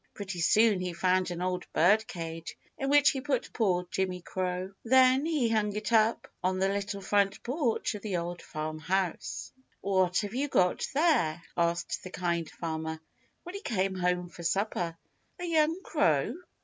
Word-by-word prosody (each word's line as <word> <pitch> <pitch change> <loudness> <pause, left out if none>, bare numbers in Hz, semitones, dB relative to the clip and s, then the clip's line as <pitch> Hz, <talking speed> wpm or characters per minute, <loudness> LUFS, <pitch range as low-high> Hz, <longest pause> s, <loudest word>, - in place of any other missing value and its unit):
Pretty 195 -3 -5
soon 215 +4 +4
he 180 -1 -3
found 185 +1 +1
an 175 0 -4
old 180 -1 -2
birdcage, 165 -3 +1 0.2
in 270 - -2
which 290 0 +6
he 270 - -4
put 265 -3 -2
poor 180 -6 +1
Jimmy 185 0 -1
Crow. 185 +1 -3
Then 260 +4 +5
he 300 -7 +1
hung 210 -2 0
it 215 +2 -3
up 220 0 +3 0.2
on 185 +1 +1
the 190 +1 +2
little 200 0 -3
front 200 0 +1
porch 250 -3 0
of 210 - -7
the 195 -4 -2
Old 175 +1 -4
Farm 155 0 -5
House. 180 +2 -2 0.3
"What 185 -2 +2
have 205 0 -5
you 275 +4 0
got 180 -9 +2
there," 280 - +2
asked 170 0 0
the 185 - -7
Kind 170 -3 -2
Farmer 160 -1 -4 0.4
when 355 - -8
he 400 - -6
came 195 - 0
home 180 -1 0
for 175 - -11
supper, 175 -2 -1 0.4
"a 355 - -3
young 325 0 +2
crow?" 160 - +2
190 Hz, 170 wpm, -29 LUFS, 175-225 Hz, 0.4 s, which